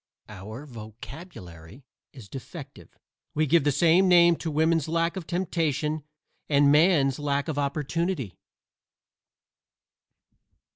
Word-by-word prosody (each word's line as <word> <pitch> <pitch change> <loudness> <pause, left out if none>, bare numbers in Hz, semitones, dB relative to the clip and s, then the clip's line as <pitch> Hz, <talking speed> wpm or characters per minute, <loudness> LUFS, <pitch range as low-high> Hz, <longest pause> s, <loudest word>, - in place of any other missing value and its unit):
Our 110 +7 -9
vocabulary 110 - -11 0.3
is 125 -7 -13
defective; 135 - -11 0.4
we 155 +1 +2
give 160 +1 +3
the 145 - +3
same 170 +6 +4
name 175 -1 +6
to 165 - -4
woman's 160 0 +1
lack 165 +2 0
of 185 -4 -7
temptation 155 -4 -1 0.5
and 140 -1 +4
man's 150 -4 +3
lack 145 0 -1
of 150 -3 -2
opportunity. 145 - -2
145 Hz, 105 wpm, -26 LUFS, 130-165 Hz, 0.5 s, name